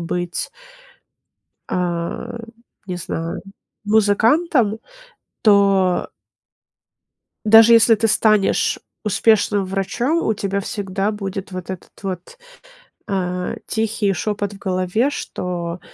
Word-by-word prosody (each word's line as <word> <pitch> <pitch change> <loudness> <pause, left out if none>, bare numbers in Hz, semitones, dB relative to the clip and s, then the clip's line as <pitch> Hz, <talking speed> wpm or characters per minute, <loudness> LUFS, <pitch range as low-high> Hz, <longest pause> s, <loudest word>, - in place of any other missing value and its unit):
быть 175 +1 -3 1.2
а, 180 +7 -3 0.5
не 180 -1 -4
знаю, 165 -1 -4 0.4
музыкантом, 220 +4 +3 0.6
то 195 -3 +3 1.4
даже 225 +2 +8
если 230 0 +7
ты 225 +1 +1
станешь 215 -1 +2 0.3
успешным 205 -1 +2
врачом, 195 - -1
у 220 - +1
тебя 200 0 -2
всегда 195 0 -2
будет 195 -2 -5
вот 185 0 -6
этот 185 - -8
вот, 190 - -6 0.7
а, 180 -2 -2
тихий 220 -2 0
шепот 205 +2 -2
в - - -11
голове, 185 +7 0
что, 175 -9 -4
200 Hz, 95 wpm, -20 LUFS, 185-220 Hz, 1.4 s, даже